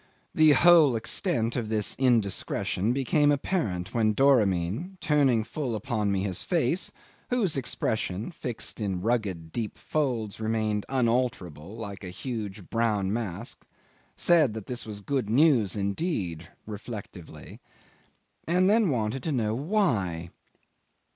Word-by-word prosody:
The 155 -1 +6
whole 160 -4 +6
extent 115 - 0
of 115 -4 -2
this 110 -2 0
indiscretion 115 -3 +1
became 140 +3 +2
apparent 110 - -1
when 110 -2 +2
Doramin, 120 - +2
turning 140 -8 +3
full 125 0 -3
upon 105 -2 -1
me 95 -1 0
his 95 -2 -2
face, 165 - 0 0.4
whose 225 -10 +1
expression, 110 - -2
fixed 115 -7 -5
in 95 -4 -2
rugged 100 -8 -1
deep 110 +1 -4
folds, 120 -10 -2
remained 110 -2 -1
unalterable, 115 - -1
like 100 -3 -7
a 90 - -6
huge 105 -2 -6
brown 105 -4 +1
mask, 110 -1 -5 0.5
said 155 -10 +3
that 110 -3 -6
this 125 -2 -5
was 105 -1 -6
good 130 0 -2
news 125 - +4
indeed, 100 - -2 0.2
reflectively; 105 -5 -9 0.9
and 180 +3 +3
then 215 -1 +4
wanted 120 -1 -1
to 160 - -2
know 110 -6 0
why. 115 - 0
115 Hz, 125 wpm, -27 LUFS, 100-140 Hz, 0.9 s, The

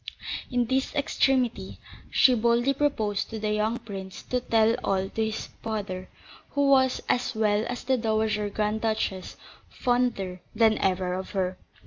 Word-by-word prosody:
In 245 -2 +1
this 265 +4 -1
extremity 270 -4 +1 0.3
she 255 - +5
boldly 235 +3 +2
proposed 220 -8 0
to 225 - -5
the 215 -1 -1
young 215 +2 +1
prince 195 -4 -8
to 250 - -1
tell 225 -2 +3
all 195 0 0
to 225 - -1
his 220 0 -3 0.2
father, 200 -4 -4 0.4
who 285 -1 +2
was, 260 -1 +3
as 250 0 0
well 210 -1 +2
as 245 - -4
the 260 0 +2
Dowager 215 -2 0
Grand 210 +1 -1
Duchess, 215 -4 -2 0.3
fonder 240 -8 0
than 220 -1 +4
ever 185 -1 0
of 185 +1 -4
her. 185 -1 0
220 Hz, 150 wpm, -27 LUFS, 205-245 Hz, 0.4 s, she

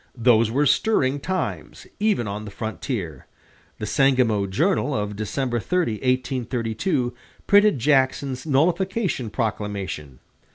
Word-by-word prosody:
Those 115 -2 +4
were 140 +6 +1
stirring 145 -6 +2
times, 185 +3 -4
even 205 - +1
on 105 +1 -4
the - - -7
frontier. 110 - -5 0.5
The - - -4
"Sangamo 125 -7 +2
Journal" 150 - +1
of 105 -1 -2
December 120 +4 -2
30, 180 +1 0
1832, 125 - -1 0.3
printed 205 -3 +5
Jackson's 130 0 +1
nullification 170 - 0
proclamation. 100 - -4
125 Hz, 110 wpm, -23 LUFS, 110-145 Hz, 0.5 s, printed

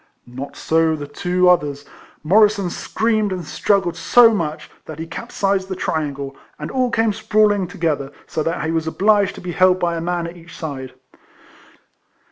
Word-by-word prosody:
Not 130 +3 -8
so 160 0 +1
the 145 -1 -6
two 180 +5 0
others: 145 -5 +2 0.4
Morrisson 200 +1 +3
screamed 215 0 0
and 180 -3 -4
struggled 190 0 0
so 230 +4 +5
much, 155 -6 -3 0.2
that 155 - -8
he 160 - -5
capsized 190 +3 -2
the 190 - -3
triangle, 140 -5 -3 0.2
and 150 - -6
all 255 -1 +1
came 225 -2 +1
sprawling 210 -2 +2
together, 160 -7 -2
so 155 - -3
that 165 +1 -2
he 160 - -1
was 165 -1 -1
obliged 200 +3 +2
to - - -10
be 180 - -5
held 185 +1 +3
by 170 -1 0
a 165 - -3
man 175 0 -2
at 170 +1 -8
each 170 0 -13
side. 135 -5 -6
175 Hz, 170 wpm, -20 LUFS, 155-200 Hz, 0.4 s, so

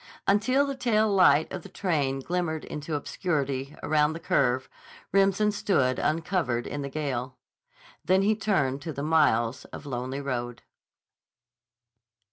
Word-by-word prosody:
Until 255 +8 +3
the 275 - -3
tail 225 -5 +2
light 180 -5 +4
of 185 - -4
the - - -12
train 145 -8 -1
glimmered 170 0 -2
into 150 +1 -5
obscurity 140 -3 -2
around 150 0 +2
the 165 - -6
curve, 130 -5 +1 0.4
Remsen 195 +2 +3
stood 140 -11 +1
uncovered 155 -7 0
in 145 - -4
the 140 - -4
gale. 130 -3 -3 0.7
Then 190 +2 +3
he 215 +2 +3
turned 145 -11 0
to 160 +1 -5
the 140 - -4
miles 130 -7 +2
of - - -10
lonely 130 0 -4
road. 120 -3 -4
155 Hz, 135 wpm, -27 LUFS, 135-190 Hz, 0.7 s, light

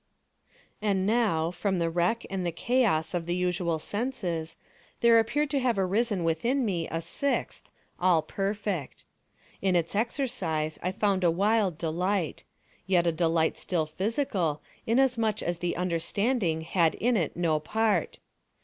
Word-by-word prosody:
And 195 -3 +1
now, 200 -8 +2
from 190 +2 -1
the 165 -1 0
wreck 175 +8 0
and 195 -1 -3
the 175 - -1
chaos 170 -5 +1
of 170 -1 -2
the 175 - 0
usual 180 -2 0
senses, 180 -5 -3 0.4
there 235 -1 +6
appeared 285 +6 0
to 285 - +2
have 245 -4 +1
arisen 195 +1 +1
within 235 +12 +1
me 175 -6 -1
a 165 - -2
sixth, 275 +12 -2 0.3
all 175 -3 +3
perfect. 195 -6 -3 0.6
In 190 -2 +2
its 170 -1 0
exercise 200 - -1
I 180 - -1
found 195 -1 0
a 175 - +5
wild 195 0 +2
delight—yet 175 +1 -2
a 170 - +3
delight 160 -1 +1
still 170 -4 0
physical, 190 - -1 0.2
inasmuch 230 -3 +2
as 175 0 -2
the 175 0 -1
understanding 180 +1 0
had 165 0 +1
in 245 +1 +1
it 170 -7 -1
no 165 -3 +1
part. 210 +2 0
185 Hz, 140 wpm, -28 LUFS, 165-220 Hz, 0.6 s, there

